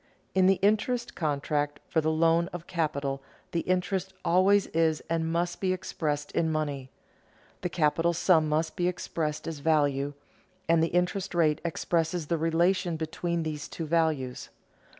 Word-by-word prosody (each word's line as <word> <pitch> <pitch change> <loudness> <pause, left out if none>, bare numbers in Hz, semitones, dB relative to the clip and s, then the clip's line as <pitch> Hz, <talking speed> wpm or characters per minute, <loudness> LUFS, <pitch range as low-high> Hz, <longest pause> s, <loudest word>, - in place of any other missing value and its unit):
_ - - -38 0.3
In 185 -1 +4
the 195 - +5
interest 235 +4 +1
contract 145 -1 -1
for 160 - +1
the 155 - +1
loan 165 +2 +3
of 175 -2 -8
capital 140 -5 -2 0.3
the 170 - 0
interest 185 +2 -1
always 190 +3 +4
is 160 -1 +2
and 165 0 0
must 175 +1 -1
be 185 -1 +2
expressed 150 -5 -3
in 160 -1 +1
money; 145 -4 -2 0.7
the 180 - -1
capital 165 +1 +2
sum 165 -2 +3
must 160 +1 0
be 175 -2 +1
expressed 160 -4 -3
as 160 -3 -4
value; 145 -2 +1 0.5
and 165 0 +4
the 165 - +3
interest 180 +2 -1
rate 155 -3 +3
expresses 170 0 -1
the 165 +2 -1
relation 170 +1 +1
between 165 +1 -2
these 150 -2 -4
two 165 - -5
values. 155 -6 0
165 Hz, 155 wpm, -28 LUFS, 155-175 Hz, 0.7 s, the